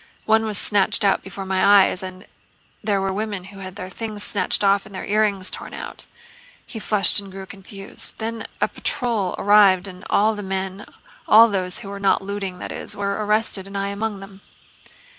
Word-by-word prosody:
One 220 0 +3
was 210 -2 -2
snatched 205 +2 +3
out 195 - +3
before 195 0 -7
my 190 0 0
eyes... 200 -1 +5
and 185 +1 -8 0.6
there 205 -2 +1
were 195 0 -1
women 205 -2 -3
who 195 +1 -12
had 185 -1 -8
their 185 -3 -6
things 210 +1 -2
snatched 200 0 0
off 200 +1 +3
and 200 - -12
their - - -5
earrings 205 -2 +2
torn - - -7
out..." - - -7 0.6
he 225 - -8
flushed 210 -1 +2
and 200 -1 -9
grew 190 0 -8
confused. 195 +1 -6
"Then 225 0 -4
a - - +2
patrol 225 -8 -2
arrived 200 -2 +5
and 185 -1 -11
all 215 +2 +3
the 210 - -6
men—all 195 +3 +2
those 185 -2 0
who - - -7
were 200 0 -6
not 195 0 +2
looting, 195 -2 -4
that - - -6
is—were 200 0 -4
arrested, 210 -2 0
and 200 0 -6
I 200 0 -1
among 200 0 -3
them." 195 0 -12
200 Hz, 185 wpm, -22 LUFS, 190-210 Hz, 0.6 s, eyes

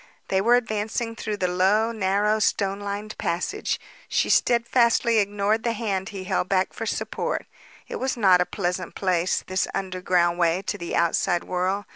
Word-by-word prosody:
They 190 0 +2
were 235 +4 +5
advancing 225 0 -2
through 215 -2 -4
the 185 - 0
low, 195 +5 +2
narrow 210 0 +1
stone 200 -2 0
lined 205 +1 -5
passage. 180 - -2 0.3
She - - +1
steadfastly 235 -1 +3
ignored 205 +2 +1
the 235 0 -1
hand 200 -3 -2
he 195 -2 -6
held 185 0 -1
back 190 -1 +1
for 225 - -5
support. - - -2 0.4
It - - -5
was 260 -1 -2
not 190 -5 +5
a 180 - 0
pleasant 180 -2 -3
place, 180 -2 0
this 185 0 -1
underground 180 -2 0
way 170 +2 +2
to - - -3
the 170 - -4
outside 170 +1 +1
world. 185 +3 -1
200 Hz, 165 wpm, -24 LUFS, 185-220 Hz, 0.4 s, were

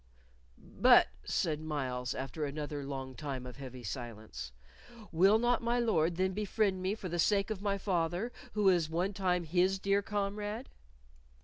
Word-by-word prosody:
"But," - - +5 0.2
said 155 -2 0
Myles, 130 -5 -2
after 135 +3 -4
another 145 0 -3
long 135 -1 -5
time 135 -2 -5
of 125 0 -8
heavy 130 -2 -8
silence, 110 - -6 0.6
"will 190 +6 +5
not 240 +1 +2
my 235 +1 +1
Lord 175 -8 +2
then 185 +1 +1
befriend 205 -1 0
me 190 +3 0
for 200 - -6
the 175 0 -3
sake 200 +3 +2
of 205 -3 -3
my 200 -1 0
father, 180 +3 -1 0.2
who 210 -1 0
was 175 -5 +4
one 180 +5 0
time 180 -2 +1
his 180 +4 +2
dear 200 +1 +2
comrade?" 205 +3 -3
180 Hz, 155 wpm, -32 LUFS, 140-200 Hz, 0.6 s, But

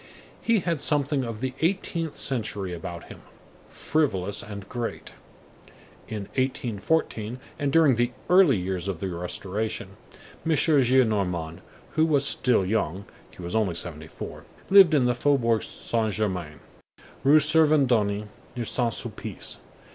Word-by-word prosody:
He 230 -4 +2
had 165 -4 -2
something 145 -2 +1
of 115 -2 -6
the 130 0 -2
eighteenth 165 -2 -1
century 105 -8 -2
about 85 0 -7
him; - - -12 0.5
frivolous 100 - -1
and 100 -1 -9
great. 120 0 -5 0.9
In 105 -2 -5 0.2
1814 125 -1 -1 0.2
and 145 -2 0
during 155 -3 +5
the 120 0 +2 0.2
early 180 - +5
years 95 0 -3
of 95 -4 -3
the 95 - -3
Restoration, 95 +4 -4 0.5
M. 160 - +1
Gillenormand, 110 - +2 0.3
who 160 +1 +2
was 145 -3 +2
still 120 -9 +2
young,—he 100 -3 -4
was 85 +5 -4
only 105 -6 +1
seventy 80 -2 -4
four,—lived 190 - +2
in 135 -4 +3
the 125 - +2
Faubourg 120 -4 +2
Saint 110 -2 -2
Germain, 90 -9 -3 0.6
Rue 145 +3 +6
Servandoni, 135 -10 +4 0.3
near 120 -1 -3
Saint 120 0 0
Sulpice. - - -6
115 Hz, 125 wpm, -25 LUFS, 95-145 Hz, 0.9 s, Rue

